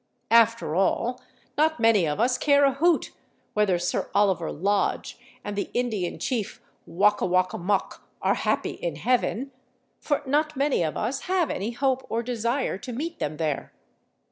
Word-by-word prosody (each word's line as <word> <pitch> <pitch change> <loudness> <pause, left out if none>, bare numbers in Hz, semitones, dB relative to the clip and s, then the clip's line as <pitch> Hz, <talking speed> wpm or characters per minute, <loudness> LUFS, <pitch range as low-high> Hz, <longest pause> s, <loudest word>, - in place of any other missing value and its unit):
After 230 -7 +4
all, 235 +7 0 0.4
not 315 -1 +2
many 225 -7 +4
of 150 - -2
us 250 +2 +2
care 285 0 +4
a 275 - +3
hoot 330 +4 +2 0.4
whether 210 -4 +2
Sir 175 0 -2
Oliver 190 -5 +2
Lodge 200 +5 -1 0.2
and 205 - -5
the 200 - -2
Indian 220 -8 -1
chief 235 -6 -3 0.3
Wok 205 +4 +2
a - - +2
wok 185 0 +2
a - - -4
mok 190 +2 -1 0.2
are - - +2
happy - - -1
in - - -4
heaven, 250 +1 0 0.5
for 290 -1 -1
not 300 +3 +1
many 280 -6 +1
of 155 -3 -1
us 265 +5 -2
have 370 -4 +1
any 200 +4 -2
hope 265 +2 0
or 230 +1 -1
desire 235 -2 -1
to 250 - -7
meet 320 +8 -5
them 150 +1 -3
there. 155 -4 -2
230 Hz, 170 wpm, -25 LUFS, 195-270 Hz, 0.5 s, After